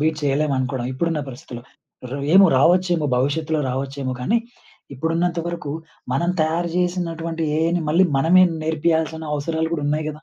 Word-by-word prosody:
Beat 155 +1 +1
చేయలేమనుకోడం 135 -3 0
ఇప్పుడున్న 165 +3 -1
పరిస్థితుల్లో. 125 -2 -9 0.5
రే 135 - -4 0.2
ఏమో 195 0 +8
రావొచ్చేమో 175 +1 +3
భవిష్యత్తులో 155 +4 0
రావచ్చేమో 135 0 -3
కానీ 215 - +2 0.6
ఇప్పుడున్నంత 165 +5 -1
వరకు 170 -4 -4 0.4
మనం 170 +6 +1
తయారు 165 +2 0
జేసినటువంటి 170 -2 -2 0.2
ఏఐని 165 +2 +1
మళ్ళీ 175 +4 +5
మనమే 175 +7 +5 0.2
నేర్పియాల్సిన 160 0 0
అవసరాలు 160 +2 -1
గూడా 150 - -3
ఉన్నయి 150 +1 -1
గదా! 155 0 -8
160 Hz, 135 wpm, -21 LUFS, 140-170 Hz, 0.6 s, ఏమో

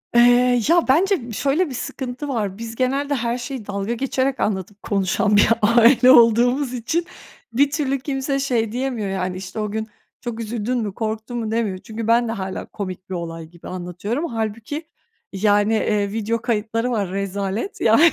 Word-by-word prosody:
Eee, 245 0 +5
ya, 340 0 +4
bence 330 - +2
b - - -6
şöyle 285 - +1
bir - - -6
sıkıntı 265 +1 -5
var, 210 -8 -2
biz 230 0 -7
genelde 275 +3 0
her 235 -1 -1
şeyi 250 -2 -6
dalga 200 +2 -2
geçerek 265 +2 -1
anlatıp 195 0 -2
konuşan 200 +1 +1
bir 205 - +5
aile 235 +4 +6
olduğumuz 245 +2 +5
için 255 +8 -1 0.5
bir 280 +4 +3
türlü 275 -3 0
kimse 275 0 -2
şey 235 -5 0
diyemiyor 245 -4 -2
yani, 185 -1 -2
işte, 190 +3 -7
"O 210 -1 -2
gün 220 +1 -3 0.3
çok 240 -2 -5
üzüldün 230 +2 -2
mü, 215 -4 -2
korktun 220 +2 -4
mu?" 225 -2 -3
demiyor. 220 -4 0
Çünkü 220 +4 -6
ben 235 +1 +4
de - - -2
hâlâ 190 -4 -4
komik 185 -2 -7
bir 190 - -3
olay 165 -1 -5
gibi 170 +1 -13
anlatıyorum. 185 - -4
Hâlbuki, 230 +6 -4 0.5
yani, 205 +2 +3
eee, 210 -2 +1
video 225 +1 -1
kayıtları 230 +1 -1
var 205 -6 -1
rezalet 200 - -3
ya 225 0 +5
230 Hz, 170 wpm, -21 LUFS, 205-255 Hz, 0.5 s, aile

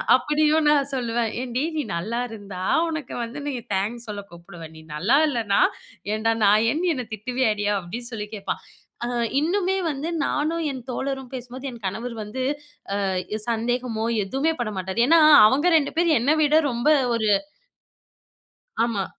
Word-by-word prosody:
அப்படியும் 305 +1 +2
நான் 280 -2 +3
சொல்லுவேன். 235 -2 -1
"ஏன்டி 250 +1 -2
நீ 300 - +1
நல்லாயிருந்தா 205 -1 -4 0.3
உனக்கு 315 -5 -5
வந்து 235 +5 -6
நீ - - -1 0.2
தேங்க்ஸ் 225 +5 -3
சொல்ல 205 -1 -5
கூப்பிடுவ 170 0 -12
நீ 160 - -13
நல்லா 205 - +3
இல்லன்னா 225 -7 +1 0.5
ஏன்டா 225 +1 +1
நாயேனு 230 - +3
என்ன 250 - -4
திட்டுவியாடி" 220 -1 -1
அப்டின்னு 235 +7 -7
சொல்லி 210 -2 -4
கேப்பான் 195 - -4 0.4
அ - - -2 0.3
இன்னுமே 380 +4 +1
வந்து 285 +3 -4 0.2
நானும் 320 +3 -1
என் 255 -2 -7
தோழரும் 265 0 -4
பேசும்போது 255 +2 -7
என் 230 -3 -13
கணவர் 230 +5 -5
வந்து 215 +5 -5 0.6
அ 195 - 0 0.4
சந்தேகமோ 230 0 -1 0.2
எதுவுமே 270 +10 0
பட 225 - -1
மாட்டாரு. 190 +4 -4
ஏன்னா 330 0 +6 0.3
அவங்க 285 +8 +2
2 290 -3 -1
பேர் 335 -3 +4
என்ன 270 +6 +2
விட 295 +1 +3 0.2
ரொம்ப 240 +5 +1 0.3
ஒரு 220 -2 0 1.6
ஆமா. 210 -5 -1
240 Hz, 145 wpm, -24 LUFS, 215-280 Hz, 1.6 s, ஏன்னா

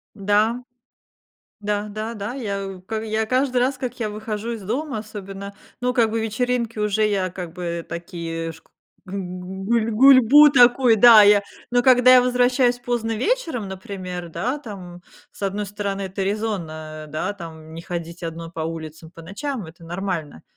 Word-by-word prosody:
Да. 215 +4 +1 1.0
Да-да-да, 210 +2 -4
я 200 -6 -3
у 185 -1 -9 0.2
я 220 0 -1
к - - -19
каждый 255 0 +1
раз, 255 +2 +1
как 255 -2 -5
я 215 -2 -2
выхожу 215 +1 -4
из 225 -3 -5
дома, 255 +5 -3
особенно, 200 -2 -8 0.3
ну, 250 - +1
как 235 -3 +2
бы 225 - -1
вечеринки 230 +1 -1
уже 210 0 +1
я 190 -3 -1
как 180 -3 -7
бы 170 -2 -4
такие 165 -1 -5
шк 160 0 -18 0.4
г 190 +1 -7 0.5
гуль 230 0 +1
гульбу 270 +4 +7
такой, 245 -2 +6
да, 225 -1 +9
я, 205 0 +6 0.3
но 245 0 +3
когда 255 0 +6
я 250 - +8
возвращаюсь 250 0 +2
поздно 240 -2 -2
вечером, 320 - -1
например, 185 -2 -6
да, 250 - -2
там, 185 -8 -10 0.3
с - - -17
1 200 +1 -2
стороны, 200 0 -4
это 190 +1 -5
резонно, 165 -7 -4
да, 180 +7 -3
там, 160 -4 -10
не 165 - -7
ходить 170 0 -6
1 165 0 -6
по 165 - -8
улицам 160 0 -6
по 165 -1 -13
ночам, 205 - -5
это 165 +1 -14
нормально. 170 - -4
205 Hz, 160 wpm, -22 LUFS, 180-240 Hz, 1.0 s, да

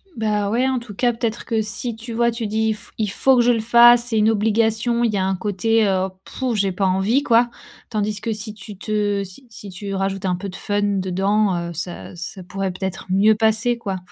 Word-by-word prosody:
Ben 210 -2 0
ouais, 245 +5 +1
en 260 -1 0
tout 235 -4 -11
cas 240 +3 +2
peut-être 230 0 -3
que 225 -2 0
si 220 +2 -4
tu 230 +2 -9
vois, 235 +1 +2
tu 230 -1 -4
dis: 220 +1 +1
«F 210 - -14
il 215 -2 0
faut 265 +5 +3
que 240 - +5
je 245 - +4
le 230 - +1
fasse 235 +1 +6
c'est 235 -2 -1
une 215 +1 +4
obligation» 225 +2 +1
il 230 -3 +1
y - - 0
a 190 - +1
un 190 0 0
côté, 215 +3 +1
heu: 190 -1 +1 0.2
«Pff, 255 -3 -3
j'ai 195 -2 +1
pas 190 +1 0
envie» 195 +8 +2
quoi. 240 0 +4 0.4
Tandis 210 -1 -1
que 225 - -2
si 210 0 -7
tu 210 -1 -10
te 205 -2 -1
si 195 +8 -12
si 205 -2 -10
tu 195 +2 -6
rajoutes 195 0 -2
un 180 -1 +1
peu 195 +3 -6
de 180 - -9
fun 205 -1 -2
dedans, 195 0 +1
heu, - - -7
ça 175 +2 -6
ça 185 +3 -7
pourrait 195 +1 -3
peut-être 190 +1 -5
mieux 205 +3 +5
passer 225 +2 +1
quoi. 200 -5 -4
215 Hz, 235 wpm, -21 LUFS, 195-230 Hz, 0.4 s, fasse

